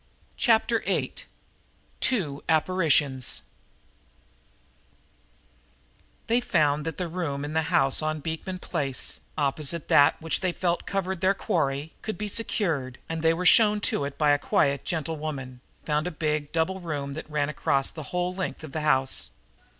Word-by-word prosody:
Chapter 230 0 +3
Eight - - -2 0.7
Two 155 - 0
Apparitions 150 -6 +2 2.8
They 235 +2 +2
found 150 -8 +1
that 165 - -3
the 180 - -2
room 160 -5 -3
in 150 - -5
the 160 - +3
house 135 -7 +3
on 155 0 -1
Beekman 160 +5 -4
Place, 140 -7 -2 0.2
opposite 150 +2 0
that 145 - +5
which 160 -2 -1
they 185 -2 0
felt 175 -1 -1
covered 190 -2 -2
their 195 +1 +3
quarry, 145 -4 -1
could 215 - -4
be 210 0 -3
secured, 160 - -2
and 165 -1 -3
they 165 0 +3
were 180 +2 -3
shown 210 +1 +6
to 145 - +1
it 140 0 -5
by 150 -1 +4
a 145 - +3
quiet 140 -1 +2
old - - -31
gentlewoman, 155 -7 -4 0.2
found 150 +2 0
a 170 -4 -6
big 150 -2 -1
double 170 +4 0
room 145 -5 -4
that 155 +1 -7
ran 150 -1 0
across 135 -2 0
the 155 - -7
whole 180 0 -1
length 185 -3 -4
of 155 - -8
the 155 - -3
house. 130 - +1
155 Hz, 155 wpm, -26 LUFS, 145-180 Hz, 2.8 s, shown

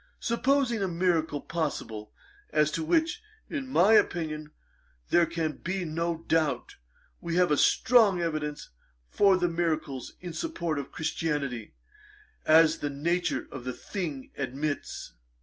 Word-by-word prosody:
Supposing 245 -1 +1
a 195 - +1
miracle 165 -4 +1
possible, 115 -10 -4 0.4
as 150 0 +2
to 165 - -2
which, 325 - +1 0.3
in 280 -4 -3
my 215 -4 +4
opinion, 155 -7 +2 0.6
there 175 -1 +5
can 165 -2 -2
be 185 0 -3
no 165 +1 -2
doubt, 150 -6 0 0.4
we 170 0 -3
have 180 -2 +3
as 150 - +4
strong 220 -6 +5
evidence 155 -3 -3 0.4
for 195 -2 +5
the 175 -1 +1
miracles 160 -6 -2
in 175 -2 -7
support 170 - -2
of 140 - -7
Christianity, 145 -8 -2 0.7
as 160 0 +6
the 145 - -2
nature 170 +5 -1
of 130 - -7
the 125 0 -3
thing 150 -4 -5
admits.' 140 +2 -4
165 Hz, 130 wpm, -28 LUFS, 150-180 Hz, 0.7 s, as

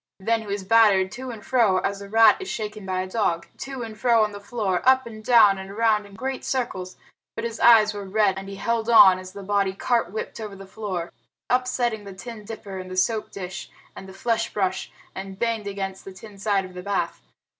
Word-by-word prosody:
Then 225 +3 0
he 220 - -10
was 200 -1 -3
battered 195 -3 +4
to 260 +2 -7
and 225 -4 -9
fro 225 -7 +3
as 200 +2 -2
a 200 - -9
rat 225 +1 +6
is 380 - -6
shaken 210 -2 -5
by 185 0 -1
a 185 - -4
dog 185 -5 0
to 270 -2 -5
and 220 -1 -7
fro 230 0 +3
on 210 - -1
the 205 - -8
floor, 200 -3 -2
up 260 0 +4
and 215 -2 -10
down, 215 -5 +6
and 190 0 -8
around 210 0 +1
in 200 - -15
great 260 +3 -4
circles, 190 -8 -3 0.4
but - - -4
his 230 -1 -4
eyes 215 -3 +6
were 205 -1 -6
red 200 -2 +2
and 195 0 -9
he 195 - -7
held 230 +2 -1
on 190 -5 +8
as 185 0 -10
the 200 - -8
body 200 -1 +1
cart 230 -1 0
whipped 215 - -5
over 210 -3 -6
the 195 0 -11
floor, 190 -4 -5 0.4
upsetting 245 -3 0
the 200 -1 -9
tin 225 +1 -9
dipper 200 -3 -7
and 185 0 -8
the 185 - -6
soap 215 +3 +1
dish 190 0 -7 0.3
and 190 - -10
the - - -11
flesh 230 +3 -1
brush, 190 -2 -2 0.2
and 190 0 -7
banged 225 -1 -1
against 195 -1 -5
the 195 - -9
tin 200 +1 -13
side 200 -2 +1
of 185 - -12
the 180 - -7
bath. 200 +1 -2
205 Hz, 230 wpm, -24 LUFS, 190-230 Hz, 0.4 s, on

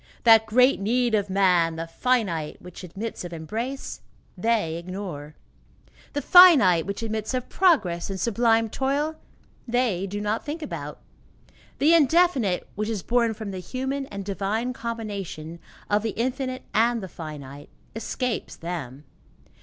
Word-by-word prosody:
That 225 -1 +6
great 250 +4 +4
need 240 +3 +1
of 205 -2 +1
man, 180 -4 +3
the 165 +1 -4
finite, 170 -5 -1
which 180 +1 -11
admits 200 +6 -6
of 175 - -7
embrace, 225 - -5 0.3
they 195 -5 0
ignore. 170 -5 -7 0.8
The 290 - -2
finite 265 - +7
which 200 +3 -4
admits 220 +2 -3
of 250 - -3
progress 210 - +2
and 195 -1 -4
sublime 230 0 +2
toil, 285 +6 -1 0.5
they 230 -6 0
do 205 +2 -4
not 210 +2 -1
think 310 +2 -5
about. - - -6 0.8
The 310 +4 +4
indefinite, 300 - +3
which 210 +2 -3
is 215 -5 -3
born 235 -2 +1
from 210 -2 -6
the 190 - -5
human 265 +8 -4
and 200 -4 -7
divine 205 +5 -2
combination 200 -9 -6 0.3
of 205 0 +2
the 220 -1 -4
infinite 255 +1 -2
and 230 0 +2
the - - -5
finite, 145 -4 -9 0.3
escapes 240 +1 -3
them. 150 -6 -6
215 Hz, 140 wpm, -25 LUFS, 180-250 Hz, 0.8 s, finite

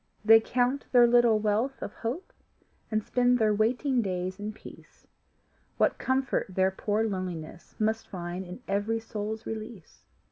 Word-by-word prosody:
They 225 +1 +9
count 250 +4 0
their 245 -2 +7
little 240 -2 +5
wealth 215 +6 0
of - - -6
hope 250 +11 -5 0.6
And 215 -1 0
spend 245 +1 +2
their 215 -2 +3
waiting 245 +5 +1
days 185 -1 -3
in 210 +1 -4
peace, 215 - -15 0.7
What - - +2
comfort 265 0 0
their 190 +1 +1
poor 210 +3 -1
loneliness 175 -4 -6
Must 220 +1 0
find 175 0 -5
in 180 +7 -10
every 205 +3 0
soul's 220 0 -5
release! 220 -5 -8
220 Hz, 145 wpm, -28 LUFS, 195-240 Hz, 0.7 s, They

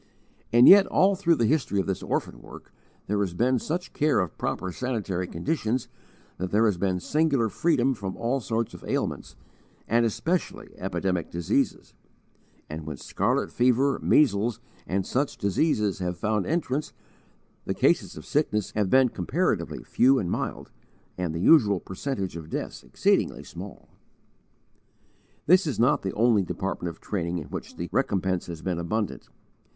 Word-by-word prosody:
And 120 +2 +7
yet, 195 0 +9
all 195 +1 +3
through 175 -3 +2
the 120 - +1
history 125 -6 +1
of 95 - 0
this 95 - -2
orphan - - -3
work, - - -13 0.3
there 105 +1 -1
has 95 -4 -1
been 125 +5 +2
such 175 - -4
care 150 0 +2
of 90 -4 -2
proper 95 - -3
sanitary 100 -6 -3
conditions 130 - -2 0.5
that 90 +1 -2
there 110 +4 +3
has 100 -5 +1
been 95 -1 0
singular 140 - +1
freedom 135 - +1
from 100 -5 -6
all 125 +4 0
sorts 115 0 -2
of - - -11
ailments, - - -3 0.5
and 115 +2 +3
especially 165 - -2
epidemic 90 -3 -2
diseases; 85 -1 -1 0.7
and 75 0 -7
when 75 -3 -5
scarlet - - -1
fever, 130 +3 +2
measles, 115 -5 +3 0.3
and 95 +1 -1
such 140 +2 -1
diseases 105 - +1
have 90 -1 -3
found 110 -2 -1
entrance, 150 -3 -1 0.7
the - - -2
cases - - +1
of 75 - -9
sickness 105 -9 0
have 105 -3 0
been 130 +3 +5
comparatively 90 -6 -1
few 135 +2 +3
and 90 -8 -1
mild, - - -4 0.4
and 90 -3 -2
the 80 - -4
usual 105 - +5
percentage 95 0 -4
of 80 -2 -8
deaths - - -5
exceedingly - - 0
small. - - -10 1.6
This 185 +2 +5
is 145 - -2
not 125 +6 +3
the 95 - -3
only 115 -1 +3
department 95 -1 -3
of 85 - -11
training 90 -4 -3
in 80 - -7
which - - -7
the 85 - -4
recompense 95 -8 0
has 85 -2 -7
been 90 -2 -2
abundant. 105 +5 -3
110 Hz, 155 wpm, -26 LUFS, 95-135 Hz, 1.6 s, yet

